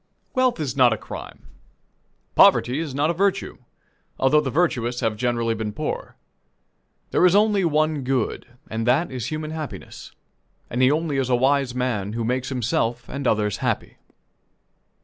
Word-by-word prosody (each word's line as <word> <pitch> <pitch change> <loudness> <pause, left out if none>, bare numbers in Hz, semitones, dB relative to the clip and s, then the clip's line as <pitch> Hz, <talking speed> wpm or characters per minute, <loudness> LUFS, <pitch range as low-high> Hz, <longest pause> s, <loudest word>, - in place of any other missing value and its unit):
Wealth 255 - +2
is 140 -4 -2
not 125 -3 +5
a - - -3
crime; - - -9 0.9
poverty 125 +4 +5
is 155 -5 -4
not 150 +3 +2
a - - -2
virtue 195 +3 -1 0.6
although 145 +3 +4
the 140 - -2
virtuous 125 -6 0
have 110 -1 0
generally 115 0 0
been 110 -1 -3
poor. - - -5 1.0
There - - +2
is 180 +1 +5
only 205 -1 +3
one 155 -2 +1
good, 125 -2 -1 0.2
and 115 +1 -3
that 140 +7 +2
is 125 -3 -4
human 155 +2 -4
happiness; 155 -2 -7 0.6
and 120 - -1
he 130 - +6
only 150 -1 0
is 130 -1 0
a 125 - +4
wise 135 0 +1
man 110 -6 -2
who 115 0 -2
makes 125 +2 -1
himself 120 -2 -1
and 140 -1 -3
others 105 -2 +1
happy. - - -2
130 Hz, 160 wpm, -23 LUFS, 120-155 Hz, 1.0 s, he